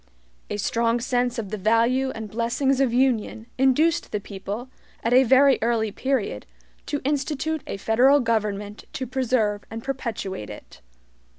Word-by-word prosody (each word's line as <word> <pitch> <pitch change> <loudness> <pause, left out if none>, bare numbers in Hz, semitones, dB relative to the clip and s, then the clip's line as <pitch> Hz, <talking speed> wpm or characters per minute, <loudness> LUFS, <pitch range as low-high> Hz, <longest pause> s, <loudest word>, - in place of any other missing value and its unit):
A 205 - -3
strong 230 +3 +1
sense 245 0 0
of 215 -4 -4
the 215 0 -4
value 230 +6 +2
and 220 -1 -6
blessings 235 +5 0
of 265 -3 +2
union 240 -3 +1
induced 305 +6 +2
the 210 - -1
people, 205 +4 -6 0.4
at 230 - +1
a 255 - +7
very 265 +2 +5
early 225 -2 +1
period, 225 - -2 0.4
to 290 - -2
institute 295 +2 -1
a - - -4
federal 250 +8 +4
government 210 -4 -2
to 260 - -3
preserve 245 -5 0
and 225 0 -7
perpetuate 230 - -4
it. - - -12
235 Hz, 150 wpm, -24 LUFS, 215-265 Hz, 0.4 s, a